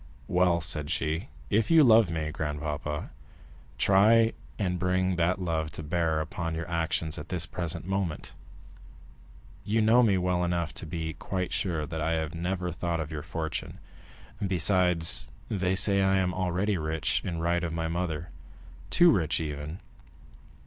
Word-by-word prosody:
"Well," 90 -1 +3
said 75 -3 -2
she; 80 +4 -1 0.2
"if 110 +2 +2
you 165 -2 +7
love 115 -6 +6
me, 80 -2 -2
grandpapa, 75 0 -4 0.7
try 110 - +5 0.2
and 90 -4 -1
bring 90 +1 +1
that 90 +2 +1
love 80 -4 -1
to 80 - -6
bear 80 0 0
upon 85 -1 -4
your 80 +1 -4
actions 80 -2 -1
at 75 - -9
this 90 -3 0
present 85 -2 -4
moment. 95 -4 -3 1.3
You 110 +2 +1
know 110 +3 +5
me 105 -5 +4
well 90 -1 +1
enough 85 -2 -1
to - - -7
be 80 -1 -4
quite 90 +3 -3
sure 85 -6 -1
that 80 +2 -5
I 80 +2 +1
have 80 -1 -2
never 90 +1 -2
thought 85 0 -2
of 80 -1 -4
your 75 -2 -4
fortune; 80 0 -4 0.7
besides, 90 -2 +2 0.2
they 95 -2 0
say 100 +1 +3
I 95 0 +3
am 90 -1 +1
already 95 +2 0
rich 80 0 0
in 85 -3 -3
right 85 +1 0
of 85 - -2
my 80 0 -2
mother—too 85 - -1
rich, 80 -7 +1
even. 75 +2 -5
85 Hz, 155 wpm, -28 LUFS, 80-95 Hz, 1.3 s, you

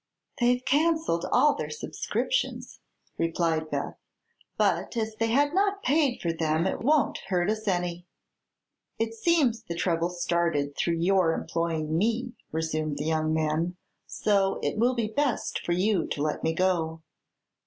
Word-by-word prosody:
"They've 245 +1 +2
cancelled 315 - +2
all 295 -1 +5
their - - -4
subscriptions," - - -2 0.4
replied 165 -1 0
Beth; - - -3 0.6
"but - - +1
as 220 -1 -2
they 225 - +1
had 285 +6 +2
not 400 +1 +1
paid 285 -3 +2
for 170 -1 0
them 160 0 0
it 190 - -1
won't 295 +3 +2
hurt 180 +1 +1
us 215 0 -4
any." 175 -2 -1 0.9
"It 225 0 -1
seems 255 -3 +2
the 170 -7 -6
trouble 170 -1 0
started 170 -5 0
through 170 -1 0
your 175 -1 +3
employing 160 -2 -2
me," 235 +4 0 0.2
resumed 155 -2 -2
the 145 - -3
young 155 0 +1
man; 160 +3 0 0.3
"so 195 -2 +1
it - - 0
will 245 +3 +3
be 235 -2 0
best 270 +3 -1
for 175 - 0
you 185 0 +1
to 145 - -2
let 150 -1 -2
me 160 - +1
go." 165 -3 0
180 Hz, 150 wpm, -27 LUFS, 165-240 Hz, 0.9 s, all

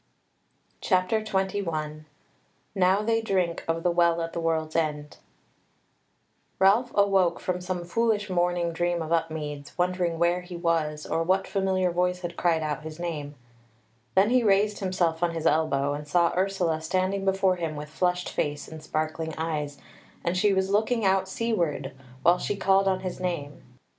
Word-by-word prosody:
CHAPTER 185 +3 +1
21 175 -7 -2 0.7
Now 190 +1 +3
They 225 +1 +1
Drink 185 -6 0
of 165 0 -1
the 175 - +3
Well 170 -1 +3
at 165 - -5
the - - -3
World's 160 -1 -1
End 150 -2 -1 1.4
Ralph 210 +6 +4
awoke 195 -3 +3
from 180 0 -2
some 180 -1 -3
foolish 215 +2 +1
morning 175 -2 0
dream 175 0 0
of 160 - -7
Upmeads, 155 -3 -2
wondering 180 -2 0
where 170 +2 +2
he 180 0 -9
was, 160 -3 0
or 165 +1 -1
what 185 +3 +1
familiar 190 -2 +1
voice 180 +1 0
had 175 -1 -5
cried 165 -2 +1
out 150 -2 -2
his 155 0 -8
name: 150 -4 -4 0.8
then 195 +4 +4
he 250 0 +4
raised 205 -1 +2
himself 175 -4 0
on 170 -1 0
his 165 - -4
elbow, 145 -2 +2
and 150 0 -6
saw 170 +2 +2
Ursula 180 -4 0
standing 185 +4 0
before 190 -1 +2
him 165 -3 -3
with 150 0 -6
flushed 180 +3 0
face 145 0 -2
and 160 -1 -9
sparkling 155 +1 -3
eyes, 150 -3 -3 0.5
and 170 +1 0
she 205 +3 +3
was 190 0 +1
looking 220 +2 +1
out 190 0 +2
seaward, 170 - -1 0.3
while 175 +2 +5
she 205 - -2
called 195 0 +3
on 190 -1 +1
his 185 -1 -5
name. 170 -6 -4
175 Hz, 165 wpm, -26 LUFS, 160-190 Hz, 1.4 s, while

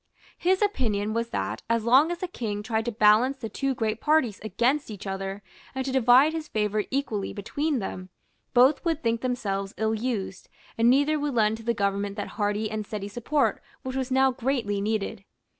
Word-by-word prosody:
His 375 +3 +2
opinion 215 - 0
was 230 +1 -1
that, - - -3
as 230 -1 +1
long 265 +7 +5
as 350 - -2
the 370 - -4
King 210 - -4
tried 225 0 -1
to 240 - -1
balance 220 +5 +4
the 225 -4 -6
two 275 +2 -1
great 220 -1 -2
parties 300 -10 +2
against 245 +7 0
each 210 -3 -8
other, 195 +1 -4 0.3
and 265 0 -2
to 270 - -2
divide 260 +4 +5
his 320 -1 -4
favour 210 -2 -1
equally 230 -7 -2
between 285 +9 -2
them, 185 -3 -5 0.5
both 260 +4 +5
would 325 -2 -1
think 230 0 0
themselves 200 -6 -2
ill 220 0 0
used, 215 -5 -3 0.3
and 230 +1 +4
neither 285 +4 +3
would 290 -3 -2
lend 220 -1 +2
to 225 - -12
the 235 +1 0
government 200 0 -1
that 205 - -4
hearty 210 0 -1
and 215 0 -3
steady 205 -2 -5
support 240 +7 0 0.2
which 260 0 -5
was 265 -1 -2
now 265 0 +4
greatly 235 -5 -1
needed. 205 -2 -2
230 Hz, 190 wpm, -26 LUFS, 210-265 Hz, 0.5 s, long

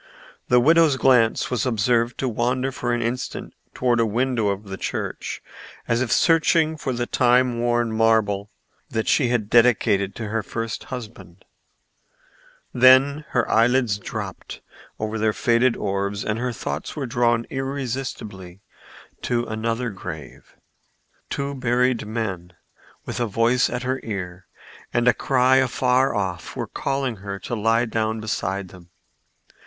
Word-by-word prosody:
The 125 - +5
widow's 160 +1 +4
glance 125 -4 +3
was 125 - 0
observed 120 0 +1
to 135 - -1
wander 125 +3 0
for 120 -2 -3
an 120 0 0
instant 120 +2 -4 0.2
toward 120 -2 +1
a - - +4
window 120 0 0
of 100 +1 -2
the 95 -2 -7
church, - - -4 0.4
as 115 +1 +1
if 130 - -1
searching 165 -1 +3
for 145 -3 -3
the 120 -1 -2
time 125 -1 +2
worn 120 -1 +1
marble 110 -3 +2 0.4
that 110 0 -2
she 130 - +3
had 120 -4 0
dedicated 105 -4 +3
to 110 -2 -5
her 115 +1 -1
first 115 +1 -5
husband; 105 -8 -9 1.3
then 130 +4 +5
her - - 0
eyelids 115 -2 +2
dropped - - -7 0.4
over 110 +1 -3
their 110 0 +2
faded 120 +2 +2
orbs 100 0 -2
and 110 +1 -1
her 125 +1 -1
thoughts 75 -9 -5
were 145 -3 -3
drawn 120 -1 +1
irresistibly 125 -9 -5 0.6
to 120 -1 -1
another 115 +2 -2
grave. 80 -7 -9 0.7
Two 140 0 -3
buried 125 -3 0
men 95 -6 -4 0.5
with - - -5
a 120 - 0
voice 115 +4 +2
at 125 +1 -4
her 130 +1 -1
ear 90 -4 -6 0.4
and 120 0 +1
a - - +7
cry 130 0 +3
afar 130 0 +2
off 95 -4 -3
were - - -3
calling 135 -4 -2
her 100 0 -6
to 95 - -7
lie 115 +2 +2
down 110 -1 -1
beside 100 -3 -3
them. 90 -1 -15
120 Hz, 145 wpm, -23 LUFS, 105-125 Hz, 1.3 s, a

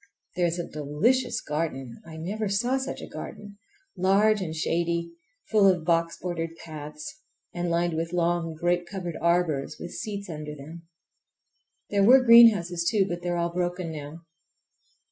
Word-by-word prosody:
There 175 -1 +2
is 170 +1 -2
a 175 - -4
delicious 170 - 0
garden! 150 -5 -4
I 160 -1 -9
never 200 +6 -3
saw 240 +7 +1
such 265 - -5
a - - -7
garden—large 210 - -1
and 160 -3 -4
shady, 170 +1 -1 0.4
full 210 -2 +5
of 180 -4 +2
box 165 -1 +1
bordered 165 -2 -4
paths, 155 - -9 0.3
and 175 0 -2
lined 170 0 +1
with 165 +1 -2
long 170 -2 0
grape 175 +2 0
covered 180 -4 -5
arbors 165 -4 +1
with 175 - -7
seats 200 -2 -5
under 150 -3 -6
them. 160 +4 -11 1.0
There 200 -1 +3
were 255 +5 +7
greenhouses, 205 -8 +6
too, 205 -4 +2
but 175 -1 -4
they 175 - -3
are 175 - 0
all 170 0 -1
broken 175 -1 -2
now. 155 +2 -8
175 Hz, 155 wpm, -26 LUFS, 165-200 Hz, 1.0 s, were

